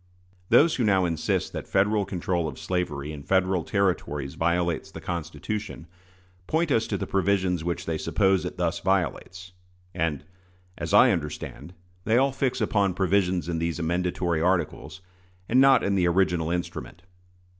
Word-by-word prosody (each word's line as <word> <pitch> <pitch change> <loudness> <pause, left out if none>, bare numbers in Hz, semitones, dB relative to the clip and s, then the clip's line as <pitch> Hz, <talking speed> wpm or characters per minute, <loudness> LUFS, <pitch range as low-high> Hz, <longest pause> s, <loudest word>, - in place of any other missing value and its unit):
Those 150 +8 +5
who 125 - +1
now 95 -4 +3
insist 85 -2 -1
that - - -6
Federal 100 +1 +2
control 90 -3 -2
of 70 - -7
slavery 75 -6 -3
in 75 -2 -8
Federal 95 +2 +1
Territories 75 -9 -1
violates 85 0 0
the - - -9
Constitution, 85 +3 -5 0.6
point 160 0 0
us 115 -3 +2
to 100 - -2
the - - -3
provisions 95 -3 0
which 85 0 -3
they 80 -1 -2
suppose 95 -2 +2
it 90 - -6
thus 85 -2 -1
violates; 95 0 -2 0.4
and, 80 -6 -2 0.5
as - - -5
I - - +7
understand, 80 +7 -5 0.3
they 110 +4 +2
all 135 +2 +3
fix 130 -2 -1
upon 100 -3 +1
provisions 95 -2 +1
in 85 -2 -2
these 85 0 -2
amendatory 85 0 -1
articles, 90 +1 -1 0.5
and 130 +3 +4
not 135 -1 +6
in 100 - +1
the 90 -3 +2
original 85 -2 +1
instrument. 90 0 -5
90 Hz, 155 wpm, -26 LUFS, 85-100 Hz, 0.6 s, I